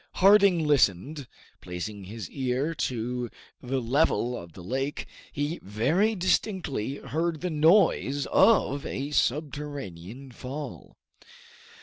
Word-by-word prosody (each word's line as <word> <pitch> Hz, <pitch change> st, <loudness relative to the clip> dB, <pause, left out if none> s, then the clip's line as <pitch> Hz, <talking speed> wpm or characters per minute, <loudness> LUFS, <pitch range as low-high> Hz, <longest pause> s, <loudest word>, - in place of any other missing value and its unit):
Harding 195 Hz, -4 st, +5 dB
listened; 140 Hz, -, +2 dB, 0.3 s
placing 95 Hz, +3 st, -6 dB
his 105 Hz, -1 st, -7 dB
ear 130 Hz, +4 st, -1 dB
to 125 Hz, -3 st, -3 dB, 0.3 s
the 130 Hz, +1 st, -2 dB
level 125 Hz, 0 st, +1 dB
of 85 Hz, -7 st, -9 dB
the 90 Hz, -, -11 dB
lake, 135 Hz, -, -3 dB, 0.3 s
he 145 Hz, +4 st, -2 dB
very 155 Hz, -, +1 dB
distinctly 175 Hz, -, 0 dB
heard 160 Hz, +4 st, -2 dB
the 180 Hz, -1 st, -2 dB
noise 155 Hz, -3 st, +3 dB
of 145 Hz, -, +4 dB
a 140 Hz, +2 st, -4 dB
subterranean 135 Hz, -, -3 dB
fall. 135 Hz, +5 st, -8 dB
140 Hz, 105 wpm, -27 LUFS, 120-160 Hz, 0.3 s, Harding